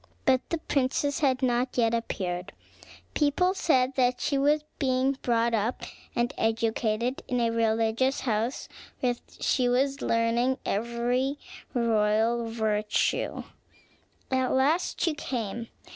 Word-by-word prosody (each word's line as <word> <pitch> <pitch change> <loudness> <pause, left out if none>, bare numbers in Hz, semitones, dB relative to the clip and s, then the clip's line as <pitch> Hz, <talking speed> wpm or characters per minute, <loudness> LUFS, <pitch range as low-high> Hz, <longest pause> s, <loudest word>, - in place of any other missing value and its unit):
But 260 -1 +4
the 335 - 0
princess 285 -1 0
had 265 -3 +1
not 250 0 0
yet 230 -1 +3
appeared. 185 -6 -3 0.6
People 320 +5 +2
said 265 -8 +2
that 250 -1 +2
she 280 - 0
was 295 +2 +3 0.2
being 265 0 +1
brought 235 -1 +1
up 225 +2 -1 0.3
and 240 +3 0
educated 225 +2 0
in 250 - 0
a 230 -1 +2
religious 230 +3 +1
house, 230 +1 -1 0.3
where 250 -1 +2 0.3
she 250 -2 +2
was 270 +3 +1
learning 235 +3 +1
every 240 +5 0 0.4
royal 230 0 +2
virtue. 215 -2 0 0.9
At 260 -1 +1
last 290 +7 +1
she 330 - +1
came. 235 -5 -4
245 Hz, 120 wpm, -27 LUFS, 230-265 Hz, 0.9 s, But